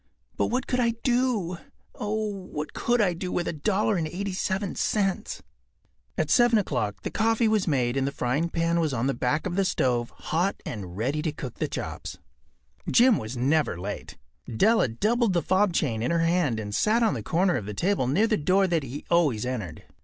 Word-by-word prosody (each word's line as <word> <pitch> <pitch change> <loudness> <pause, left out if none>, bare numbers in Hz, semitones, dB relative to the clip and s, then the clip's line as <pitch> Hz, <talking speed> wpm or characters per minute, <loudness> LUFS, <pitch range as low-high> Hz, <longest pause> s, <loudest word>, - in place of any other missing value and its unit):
But - - +1
what 250 +2 -1
could 250 - -1
I 235 -2 +2
do—oh! 215 -2 -2 0.2
what 150 -4 -6
could 240 -1 +1
I 185 -4 +2
do 180 +2 -5
with 175 - -1
a - - -1
dollar 200 +6 +1
and 160 -2 -1
eighty 190 +4 -4
seven 190 +1 -2
cents?” 195 -3 -1 0.7
At - - 0
7 240 -2 +5
o’clock 125 - -2
the - - -3
coffee 225 +1 +2
was 215 -3 +1
made 125 -5 +1
and 135 0 +1
the - - -1
frying 140 +7 -1
pan 165 0 0
was 155 -4 0
on 115 +1 -1
the 135 - +1
back 130 +6 -1
of 175 - -2
the 195 - +2
stove 125 -10 0
hot 175 +5 -1
and 95 -5 -6
ready 135 +8 -1
to 155 -1 -1
cook 135 -5 -8
the - - 0
chops. - - -6 0.7
Jim 245 -3 +5
was 110 +4 -6
never 140 - +1
late. 100 +3 -6 0.3
Della 215 - +3
doubled 215 - +1
the 170 - +1
fob 190 +1 +2
chain 120 -9 0
in 120 - 0
her 170 0 +2
hand 165 -9 +1
and 105 -1 -5
sat 220 - +2
on 225 - +3
the 120 - -4
corner 175 - +1
of 105 -5 -3
the 105 - -5
table 180 - +1
near 160 - +3
the 220 -2 +1
door 190 +6 +3
that 170 -3 +1
he 135 +2 -7
always 145 -11 +2
entered. 110 -11 -5
170 Hz, 205 wpm, -26 LUFS, 130-205 Hz, 0.7 s, 7